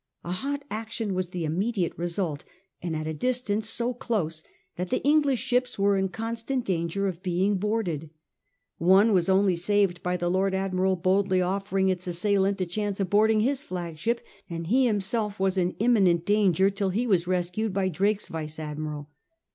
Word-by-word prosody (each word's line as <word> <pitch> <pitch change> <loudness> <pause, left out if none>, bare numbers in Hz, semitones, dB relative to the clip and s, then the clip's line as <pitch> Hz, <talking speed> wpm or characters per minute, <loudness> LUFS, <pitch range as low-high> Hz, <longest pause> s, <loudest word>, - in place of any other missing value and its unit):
A 175 - -5
hot 280 +9 -3
action 220 -1 -3
was 185 -1 -2
the 180 -2 -3
immediate 185 +3 -1
result, 170 -3 -2 0.4
and 170 -2 -3
at 155 0 -3
a 160 - -2
distance 220 +2 -1
so 240 +2 0
close 170 -10 -2 0.3
that 180 0 -4
the - - -1
English 285 -2 +3
ships 250 0 0
were 200 0 +3
in 190 0 0
constant 230 +5 -3
danger 175 +2 -1
of 185 -3 -3
being 190 +2 +1
boarded. 185 -7 -2 0.7
One 195 +6 +5
was 185 -1 +2
only 190 -1 +4
saved 185 0 +1
by 180 0 -1
the 175 - -2
Lord 190 +2 +1
Admiral 190 0 +1
boldly 185 +1 +2
offering 190 +1 0
its 185 -1 -2
assailant 195 +2 +1
a 185 - 0
chance 205 +3 -3
of 190 -3 -1
boarding 215 +1 +4
his 270 +4 +1
flagship, 180 - -3 0.3
and 165 -1 -4
he 250 +8 +3
himself 210 0 -1
was 190 0 +1
in 180 -1 0
imminent 195 -7 +3
danger 195 -2 +3
till 195 0 -1
he 220 +7 0
was 185 -6 +2
rescued 185 +4 -1
by 190 0 0
Drake's 200 +4 0
vice 155 -1 -5
admiral. 150 -1 -5
190 Hz, 175 wpm, -26 LUFS, 175-215 Hz, 0.7 s, One